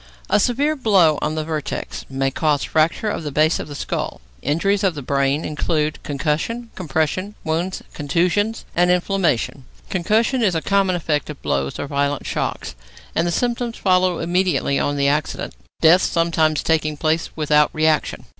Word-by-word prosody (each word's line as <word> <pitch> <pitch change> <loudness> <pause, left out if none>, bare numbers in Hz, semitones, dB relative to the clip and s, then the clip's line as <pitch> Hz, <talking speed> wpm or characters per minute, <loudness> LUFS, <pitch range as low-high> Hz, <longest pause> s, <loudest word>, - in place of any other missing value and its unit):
A - - +5
severe 280 +8 +1
blow 190 - +3
on 155 +1 -1
the 155 - -1
vertex 155 -2 -4
may 135 0 -1
cause 150 0 +1
fracture 165 +7 +1
of - - -3
the 150 -2 -5
base 155 +3 +2
of - - -5
the 145 - -8
skull. - - -3 0.2
Injuries 195 +8 +1
of 185 -4 +2
the 145 - -6
brain 140 +3 0
include 155 0 -1
concussion, 160 - -2
compression, 180 +5 -2
wounds, 170 +4 -2
contusion, 180 +9 +1 0.2
and 175 +1 +3
inflammation. 180 -8 +1 0.3
Concussion 220 +8 +1
is 195 -6 +2
a 160 - 0
common 195 -2 +2
effect 155 -4 -1
of 150 - -7
blows 70 -1 -1
or - - -3
violent 140 0 -1
shocks, - - -3 0.4
and 170 - +1
the - - 0
symptoms 240 +3 -1
follow 185 -2 +2
immediately 175 -4 +1
on 145 0 0
the 140 0 +2
accident, 150 +2 -1 0.3
death 170 +3 +6
sometimes 160 -2 +1
taking 155 -2 +1
place 160 +2 0
without 150 -1 +3
reaction. 155 -1 0
160 Hz, 165 wpm, -21 LUFS, 150-185 Hz, 0.4 s, death